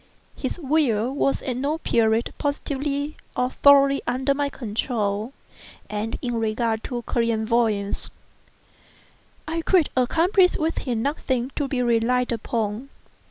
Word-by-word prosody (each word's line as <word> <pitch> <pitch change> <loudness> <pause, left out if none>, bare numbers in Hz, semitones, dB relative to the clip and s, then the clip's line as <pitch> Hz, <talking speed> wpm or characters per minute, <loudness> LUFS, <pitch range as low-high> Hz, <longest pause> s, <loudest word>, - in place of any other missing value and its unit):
His - - -4
will 265 -7 +1
was 275 -1 0
at 250 -2 -2
no 285 +4 -1
period 230 -6 +1
positively, 285 0 -2 0.2
or 250 +1 +1
thoroughly, 275 -1 +5
under 260 +3 +1
my 285 0 -1
control, 220 -2 -2 0.6
and 210 +2 -3
in 245 -1 -1
regard 225 0 -1
to 240 -2 -4
clairvoyance, 225 -3 0 1.4
I 330 +1 -2
could 345 -2 +3
accomplish 345 - +3
with 320 +1 -1
him 235 -4 -2
nothing 260 -3 -1
to 285 - -1
be 255 -2 -1
relied 245 +1 +2
upon. 225 +1 -2
250 Hz, 120 wpm, -24 LUFS, 225-280 Hz, 1.4 s, thoroughly